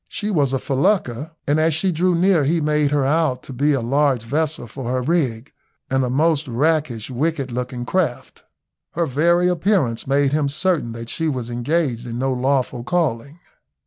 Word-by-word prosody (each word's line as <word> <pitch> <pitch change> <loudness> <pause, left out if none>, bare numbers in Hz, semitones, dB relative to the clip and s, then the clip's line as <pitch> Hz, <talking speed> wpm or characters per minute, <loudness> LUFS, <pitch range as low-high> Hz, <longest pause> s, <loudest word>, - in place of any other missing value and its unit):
She 210 +1 -3
was 145 -8 +2
a 135 - +1
felucca, 140 - 0
and 145 +2 +2
as 160 -1 +2
she 185 +4 +1
drew 180 +2 +1
near 175 -2 +3
he 165 +5 +1
made 150 -1 +1
her 145 -2 +1
out 145 -3 +1
to 135 - -8
be 145 +4 +1
a 135 - 0
large 135 0 +1
vessel 150 +3 -1
for 125 +3 -8
her 130 0 -1
rig, 135 -6 -1 0.4
and 135 0 +2
a 125 - -1
most 155 +3 +1
rakish, 135 -2 0
wicked 140 0 -1
looking 125 0 -4
craft. 160 -6 -2 0.5
Her 170 +1 0
very 170 +5 +2
appearance 175 - 0
made 140 0 +2
him 150 -2 +1
certain 155 -5 0
that 115 0 -8
she 160 - -2
was 125 -5 -3
engaged 125 -1 -1
in 115 0 -5
no 130 +1 0
lawful 130 -1 0
calling. 140 -2 -1
140 Hz, 180 wpm, -21 LUFS, 125-160 Hz, 0.5 s, near